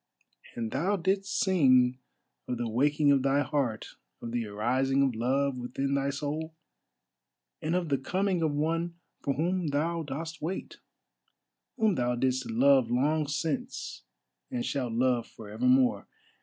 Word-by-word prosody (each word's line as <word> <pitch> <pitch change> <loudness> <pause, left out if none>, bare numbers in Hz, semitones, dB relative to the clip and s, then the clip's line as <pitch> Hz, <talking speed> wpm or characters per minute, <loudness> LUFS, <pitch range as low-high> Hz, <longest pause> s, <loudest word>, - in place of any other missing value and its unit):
And 115 -2 -3
thou 180 +9 +1
didst 195 +2 0
sing 130 -9 +4 0.5
of 125 - -2
the 120 0 -2
waking 145 +5 +3
of 140 -1 +4
thy 135 +2 +2
heart, 130 -8 -2 0.2
of 115 - -6
the 120 -2 -2
arising 130 +6 +1
of 135 -2 +1
Love 130 +3 0
within 130 +3 -2
thy 140 0 +1
soul, 150 +3 -4 1.1
and 160 +3 -1
of 180 -3 -1
the 140 -2 +1
coming 185 +5 0
of 160 -2 +2
one 165 +3 -1 0.3
for 140 - -1
whom 175 +3 0
thou 160 +4 0
dost 160 +3 -6
wait, 175 +5 -5 1.0
whom 220 -4 +3
thou 125 -5 0
didst 130 0 0
love 130 +1 +4
long 145 +5 +1
since 165 - -3 0.5
and 250 -3 -3
shalt 125 -5 -2
love 120 0 +1
for 105 -2 -11
ever 110 +4 -3
more. 130 0 +3
140 Hz, 150 wpm, -29 LUFS, 125-160 Hz, 1.1 s, sing